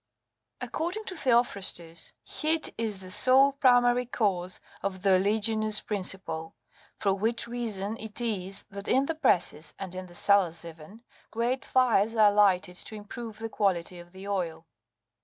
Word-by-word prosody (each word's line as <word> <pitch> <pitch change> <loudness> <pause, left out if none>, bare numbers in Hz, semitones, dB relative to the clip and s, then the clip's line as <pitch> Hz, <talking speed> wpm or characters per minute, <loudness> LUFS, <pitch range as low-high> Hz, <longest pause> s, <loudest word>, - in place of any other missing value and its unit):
According 350 +7 -3
to 375 - -6
Theophrastus,26 200 - -1 0.3
heat 315 0 +1
is 215 -4 -3
the 185 -1 -7
sole 260 +7 +6
primary 245 -2 +3
cause 185 -7 -1 0.2
of 190 -1 -4
the 195 -1 +4
oleaginous 215 +2 +2
principle; 185 -5 -4 0.4
for 195 -2 +1
which 225 +4 -1
reason 225 -3 -4
it 220 0 -4
is, 195 -5 -2
that 200 +1 -8
in 265 +2 +3
the 325 - -1
presses,27 170 - 0
and 190 -2 -6
in 185 0 -6
the 175 - -15
cellars 180 -4 +2
even, 165 +7 -12 0.3
great 240 +4 -1
fires 230 -4 +2
are 215 -2 +6
lighted 190 -3 +3
to 215 - -6
improve 215 +1 -8
the 225 +1 -4
quality 180 -4 -1
of 175 0 -13
the 190 +2 -10
oil. 170 -5 -3
205 Hz, 150 wpm, -28 LUFS, 185-235 Hz, 0.4 s, sole